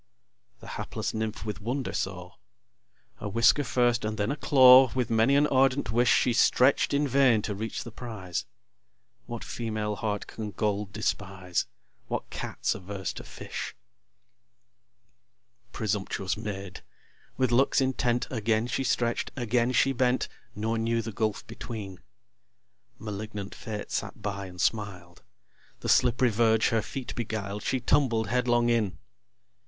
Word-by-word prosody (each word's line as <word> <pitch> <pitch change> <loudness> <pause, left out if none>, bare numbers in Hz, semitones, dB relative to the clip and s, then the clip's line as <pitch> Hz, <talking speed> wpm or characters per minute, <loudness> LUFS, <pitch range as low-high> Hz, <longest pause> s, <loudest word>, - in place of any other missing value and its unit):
The - - -11
hapless - - -4
Nymph 110 0 -3
with 105 -2 -5
wonder 125 +5 -2
saw: 90 -1 -4 0.9
A 105 - -4
whisker 115 +7 +4
first 120 -3 +2
and 110 0 -2
then 105 +4 0
a - - -1
claw, 130 -3 +7
With 125 -3 0
many 115 +5 +4
an 145 +1 +5
ardent 135 -3 +2
wish, 120 +2 +3
She 125 - +3
stretch'd 130 +3 +4
in 145 +1 +2
vain 130 -5 +4
to 105 - -2
reach 110 +3 -4
the 120 - -9
prize. 105 -7 -5 0.8
What 120 -1 -5
female 110 -2 -3
heart 105 0 -2
can 110 -2 -6
gold 105 0 -1
despise? 95 -3 -2 0.4
What - - -4
Cat's - - -2
averse 95 0 -5
to - - -8
fish? - - -7 2.0
Presumptuous 100 -2 -2
Maid! 100 -3 -6 0.6
with 130 -2 +2
looks 130 +3 +4
intent 125 -2 +1
Again 110 -1 +1
she 130 +2 -1
stretch'd, 120 -2 0
again 120 -1 +1
she 135 +2 +3
bent, 125 0 +1 0.3
Nor 110 +2 -1
knew 115 0 0
the 110 - -5
gulf 110 0 -2
between. 100 -5 -7 1.0
(Malignant 105 -1 -6
Fate 105 -2 -6
sat - - -3
by, 100 -1 -4
and 90 -1 -12
smiled.) 90 -5 -2 0.6
The - - -3
slipp'ry 125 0 +4
verge 110 0 +3
her 115 -1 +2
feet 130 +4 -6
beguiled, 105 -3 -4
She 130 - 0
tumbled 120 -5 +2
headlong 120 -1 +2
in. 105 -7 0
110 Hz, 140 wpm, -28 LUFS, 105-125 Hz, 2.0 s, claw